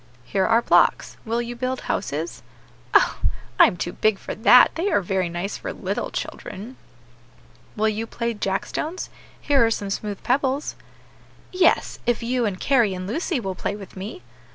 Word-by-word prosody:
"Here 190 +7 +1
are 230 +1 +4
blocks; - - +3
will 235 +1 -1
you 240 +1 -6
build 255 +1 -2
houses?" 160 -2 -3 0.5
"Oh! - - +4 0.4
I - - +10
am 180 - -3
too 175 +1 -3
big 215 -1 +2
for - - -6
that; 245 +3 +7
they 350 +5 -1
are - - +3
very 185 -1 -1
nice 175 +4 -4
for - - -5
little - - -3
children." 210 +6 -6 1.0
"Will 220 0 +1
you 220 +2 -3
play 235 0 -2
jack 195 -2 -1
stones? 330 +4 -4 0.3
here 280 -4 +3
are 225 - +4
some 205 -3 -2
smooth 205 0 -4
pebbles." 270 +2 0 0.8
"Yes, 365 -2 +2
if 240 -1 +1
you 240 -1 +1
and 185 -2 -4
Carry, 235 -8 +3
and 185 0 -5
Lucy, 295 - -1
will 195 -4 -3
play 190 +2 -3
with 200 -2 -11
me." 190 - -7
225 Hz, 175 wpm, -23 LUFS, 195-250 Hz, 1.0 s, I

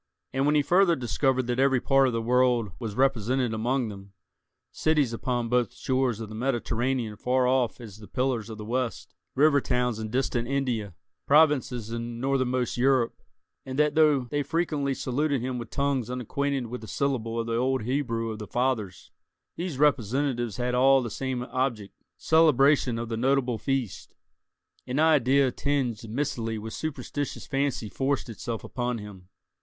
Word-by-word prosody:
And 135 +2 +1
when 150 - +3
he 145 - +4
further 175 +3 +4
discovered 130 +1 0
that 120 +1 -2
every 135 -1 +4
part 135 +1 +3
of 125 - -1
the 115 0 -1
world 125 -3 +2
was 110 -3 -5
represented 130 -1 +1
among 120 +2 0
them—cities 110 +7 -3
upon 120 0 -2
both 120 -2 0
shores 130 -4 0
of 110 - -5
the 110 - -10
Mediterranean 120 -1 -1
far 125 +3 +1
off 130 -2 +1
as 110 -4 -10
the 105 - -12
Pillars 125 -4 -1
of 110 - -7
the 105 - -7
West, 125 +1 -3 0.2
river 145 0 +4
towns 125 -3 0
in 110 -1 -4
distant 120 -1 -1
India, 120 -9 -2 0.3
provinces 140 -7 +3
in 115 0 -5
northernmost 130 -2 0
Europe; 130 -1 +3 0.5
and 130 0 -6
that, 150 0 +3
though 155 -3 +4
they 135 +4 -2
frequently 145 -2 -1
saluted 140 +3 0
him 125 +1 -3
with 120 - -7
tongues 140 -4 -1
unacquainted 130 +2 -2
with 120 +1 -7
a - - -8
syllable 115 -5 -1
of 115 - -1
the 115 0 -2
old 130 +1 0
Hebrew 115 -3 -1
of 110 - -7
the 105 - -7
fathers, 115 -8 -2 0.4
these 170 -5 -4
representatives 130 -4 +1
had 125 0 -1
all 135 +1 +5
the 115 - -5
same 130 0 -3
object—celebration 135 +3 +1
of 115 0 -4
the 115 - -2
notable 125 -1 +1
feast—an 130 0 -6
idea 140 -4 +4
tinged 125 -6 -2
mistily 115 -3 -2
with 110 +1 -7
superstitious 145 -2 -4
fancy 135 -5 -1
forced 135 -1 -1
itself 115 0 -5
upon 125 -1 -3
him. 100 -4 -10
125 Hz, 160 wpm, -27 LUFS, 115-135 Hz, 0.5 s, all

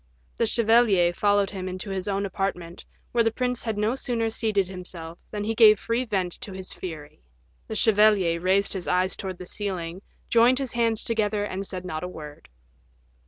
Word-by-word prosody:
The 230 - +1
chevalier 220 -7 +4
followed 205 +1 +2
him 185 -2 -5
to 195 +1 -6
his 190 -1 -3
own 200 0 -1
apartment, 180 -3 -4 0.3
where 235 -1 +3
the 225 - +3
prince 250 +1 -2
had 220 -2 -2
no 210 +3 +1
sooner 235 -4 -1
seated 210 -4 0
himself 175 -3 -8
than 205 -1 -4
he 220 +2 -1
gave 215 -2 +7
free 235 +2 -1
vent 190 -6 -1
to 210 -6 -5
his 190 0 -6
fury. 155 - -8 0.5
The 220 - -5
chevalier 205 -6 +4
raised 190 +2 +2
his 190 -3 -5
eyes 185 +1 +1
towards 190 -2 -6
the 180 - -9
ceiling, 185 -3 -4 0.3
joined 240 +2 +4
his 265 -3 -3
hands 230 -2 +1
together, 215 -2 0
and 195 -1 -4
said 185 -1 -6
not 155 -3 -4
a - - -3
word. 150 -4 -10
200 Hz, 185 wpm, -25 LUFS, 185-225 Hz, 0.5 s, gave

